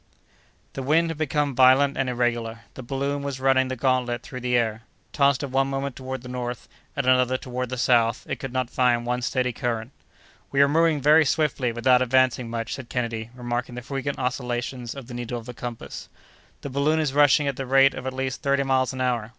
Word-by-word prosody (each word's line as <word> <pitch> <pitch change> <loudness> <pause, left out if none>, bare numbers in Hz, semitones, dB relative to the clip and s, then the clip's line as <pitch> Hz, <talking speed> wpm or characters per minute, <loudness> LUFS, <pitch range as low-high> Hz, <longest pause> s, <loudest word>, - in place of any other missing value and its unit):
The 135 - -5
wind 160 +5 +2
had 160 - -8
become 145 -2 0
violent 130 +2 +5
and 130 -1 -1
irregular; 120 -2 -1
the - - -8
balloon 140 +3 -2
was 140 -2 -4
running 130 0 +3
the 130 - -3
gantlet 125 -1 0
through 125 - -7
the 125 0 +1
air. 110 -2 -1 0.3
Tossed 140 -1 +2
at 140 - -4
one 135 +1 +2
moment 135 -1 -3
toward 130 -1 -6
the - - -9
north, 125 -1 -5 0.3
at 140 - 0
another 130 0 +3
toward 125 -1 -5
the 130 - -4
south, 120 -2 +2
it - - -3
could 135 - -6
not 130 -1 -2
find 120 -2 +2
one 125 +1 -1
steady 125 0 -1
current. 115 0 -3 0.6
"We 140 - 0
are - - +4
moving 160 0 +2
very 155 +3 +6
swiftly 140 -4 0
without 125 +2 +3
advancing 130 -1 +2
much," 115 -1 -4
said 130 -3 -8
Kennedy, 115 -2 -3
remarking 120 0 -4
the 125 - -7
frequent 135 +1 -4
oscillations 125 -1 -3
of 135 -3 -8
the 125 - -10
needle 120 0 -4
of 115 - -9
the 125 - -7
compass. 120 -1 -7 0.5
"The 140 - -6
balloon 145 +4 +1
is 150 -4 0
rushing 145 0 +4
at 140 - -1
the 135 - -4
rate 135 +1 +5
of 130 - -6
at 130 - -3
least 130 -1 -3
thirty 140 -2 +1
miles 130 -1 +1
an 130 - -5
hour. 120 -4 0
130 Hz, 215 wpm, -24 LUFS, 120-135 Hz, 0.6 s, very